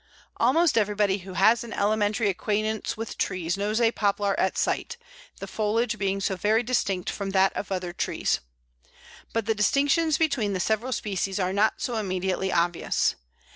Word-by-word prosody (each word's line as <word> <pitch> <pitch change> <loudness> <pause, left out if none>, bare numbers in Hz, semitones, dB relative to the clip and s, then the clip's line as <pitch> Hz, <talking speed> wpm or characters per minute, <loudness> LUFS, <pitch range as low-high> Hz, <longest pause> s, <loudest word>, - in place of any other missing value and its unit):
Almost 330 -7 +3
everybody 205 -1 +1
who 190 0 -10
has 220 +6 +4
an 235 - -8
elementary 210 +2 +1
acquaintance 215 +3 -1
with 225 0 -6
trees 175 -1 -1
knows 210 +3 -1
a 230 -1 +4
Poplar 205 -2 0
at 190 - +1
sight, 475 - -1 0.4
the - - -5
foliage 220 +1 -1
being 195 -1 0
so 195 0 -1
very 215 +5 +2
distinct 200 -7 -1
from 200 -1 -4
that 190 0 +3
of 200 - -5
other 180 -2 -3
trees. - - -1 0.9
But 230 -2 -1
the 225 - +2
distinctions 285 - +2
between 265 -11 +1
the 185 - -2
several 220 +7 0
species 195 -4 -2
are 185 0 0
not 210 +2 +1
so 240 -2 -2
immediately 190 -2 -1
obvious. 170 0 +1
205 Hz, 165 wpm, -26 LUFS, 190-225 Hz, 0.9 s, has